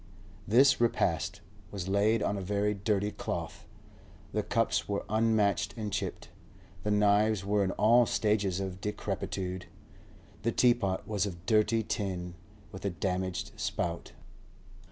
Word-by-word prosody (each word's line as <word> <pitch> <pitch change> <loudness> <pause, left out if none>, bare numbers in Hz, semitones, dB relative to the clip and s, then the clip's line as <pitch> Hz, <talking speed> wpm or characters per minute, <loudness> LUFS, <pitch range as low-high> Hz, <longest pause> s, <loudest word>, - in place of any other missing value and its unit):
This 130 +4 +5
repast 120 - +1 0.3
was 95 -3 -5
laid 105 +3 +2
on 100 - 0
a 100 - -3
very 100 +2 0
dirty 105 0 0
cloth. - - -5 0.7
The - - +1
cups - - 0
were 100 0 -2
unmatched 110 -3 +2
and 105 -3 -4
chipped, - - -3 0.5
the 105 - -2
knives 105 0 +3
were 100 0 +2
in 95 - 0
all 115 +3 +5
stages 100 -4 +1
of 95 -1 -5
decrepitude; 95 -3 -4 0.7
the 115 +3 0
teapot 115 -7 +2
was 105 -1 0
of 85 -2 -8
dirty 110 +1 +3
tin, 90 -4 -3 0.4
with 95 - -9
a 100 - 0
damaged 95 0 -2
spout. 85 0 -3
100 Hz, 135 wpm, -30 LUFS, 95-110 Hz, 0.7 s, This